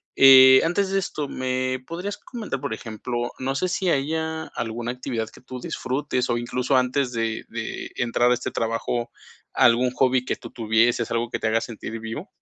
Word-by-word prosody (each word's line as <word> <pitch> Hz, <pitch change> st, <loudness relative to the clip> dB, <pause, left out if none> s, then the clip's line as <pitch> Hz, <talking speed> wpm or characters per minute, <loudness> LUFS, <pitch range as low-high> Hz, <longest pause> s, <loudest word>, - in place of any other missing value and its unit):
eh 130 Hz, -1 st, +9 dB
antes 190 Hz, +4 st, +1 dB
de 195 Hz, -, +2 dB
esto, 150 Hz, -6 st, -4 dB
¿me 130 Hz, 0 st, -1 dB
podrías 185 Hz, +5 st, -5 dB
comentar, 225 Hz, -, -6 dB
por 140 Hz, -5 st, -3 dB
ejemplo, 120 Hz, +2 st, -4 dB
no 135 Hz, +1 st, -1 dB
sé 185 Hz, -, 0 dB
si 180 Hz, +1 st, -1 dB
haya 160 Hz, +2 st, -1 dB
alguna 120 Hz, +1 st, -3 dB
actividad 125 Hz, -3 st, -4 dB
que -, -, -16 dB
tú 125 Hz, 0 st, -8 dB
disfrutes 130 Hz, -1 st, -2 dB
o 120 Hz, -, +1 dB
incluso 125 Hz, +3 st, -1 dB
antes 130 Hz, 0 st, +1 dB
de 115 Hz, -1 st, -2 dB
de 115 Hz, -1 st, -5 dB
entrar 120 Hz, 0 st, +2 dB
a -, -, +6 dB
este -, -, -3 dB
trabajo? 115 Hz, +1 st, -2 dB, 0.4 s
¿Algún 120 Hz, +2 st, +4 dB
hobby 130 Hz, 0 st, +2 dB
que -, -, -2 dB
tú -, -, -10 dB
tuvieses 115 Hz, +1 st, +1 dB
algo 115 Hz, 0 st, -1 dB
que -, -, -2 dB
te -, -, -1 dB
haga 110 Hz, +1 st, +2 dB
sentir 115 Hz, -1 st, -6 dB
vivo? 115 Hz, -, -6 dB
125 Hz, 185 wpm, -24 LUFS, 115-140 Hz, 0.4 s, eh